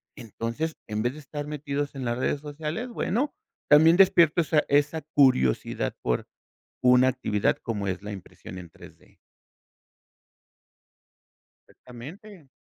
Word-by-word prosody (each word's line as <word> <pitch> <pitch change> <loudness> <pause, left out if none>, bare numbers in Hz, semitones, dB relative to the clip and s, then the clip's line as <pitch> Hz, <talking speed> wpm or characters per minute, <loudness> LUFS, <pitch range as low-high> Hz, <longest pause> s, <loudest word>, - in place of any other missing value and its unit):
entonces, 115 +8 -4
en 105 0 -2
vez 120 - +1
de 150 - -10
estar 145 0 -7
metidos 145 -1 -4
en 135 -2 -5
las 120 0 -1
redes 135 +3 -1
sociales, 150 - -5
bueno, 245 +3 -1 0.4
también 160 +3 +7
despierto 175 -4 +5
esa 155 -2 +2
esa 145 +3 +2
curiosidad 130 - +1
por - - -1 0.6
una 125 0 +5
actividad 120 -5 0
como 105 -3 -3
es 95 -1 -3
la 105 - -7
impresión 95 -1 -10
en 90 -2 -10
3D. - - -17 2.5
Exactamente. 160 - -12
145 Hz, 125 wpm, -26 LUFS, 115-155 Hz, 2.5 s, también